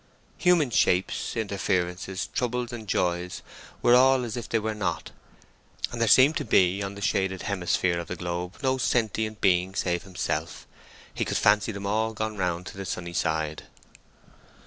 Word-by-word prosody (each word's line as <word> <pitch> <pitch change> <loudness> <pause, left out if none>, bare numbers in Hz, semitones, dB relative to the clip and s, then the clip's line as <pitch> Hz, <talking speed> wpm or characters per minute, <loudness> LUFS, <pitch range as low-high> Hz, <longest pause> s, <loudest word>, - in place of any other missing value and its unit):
Human 175 -8 +3
shapes, 90 +2 +1
interferences, 95 -3 -1
troubles, 125 0 -2
and 110 -3 -7
joys 90 -1 -1 0.4
were 120 - +6
all 130 +1 +5
as 115 -2 -4
if 120 - -6
they 115 - +2
were 110 0 -2
not, 95 -5 -3 0.8
and 120 - -5
there 115 - +3
seemed 135 +7 +6
to - - -2
be 95 -2 +3
on 100 0 -4
the 100 - -7
shaded 95 -2 0
hemisphere 90 -2 0
of 85 - -6
the 90 - -4
globe 90 +2 -4
no 130 0 +1
sentient 110 -3 0
being 95 0 +2
save 85 -2 0
himself; 85 -3 -4 0.5
he - - -1
could - - -1
fancy 105 +2 +3
them 100 -1 -6
all 110 +2 0
gone 110 0 -3
round 90 -2 -2
to 95 - -9
the 95 - -5
sunny 85 -1 -4
side. 80 -2 -1
100 Hz, 170 wpm, -26 LUFS, 90-115 Hz, 0.8 s, were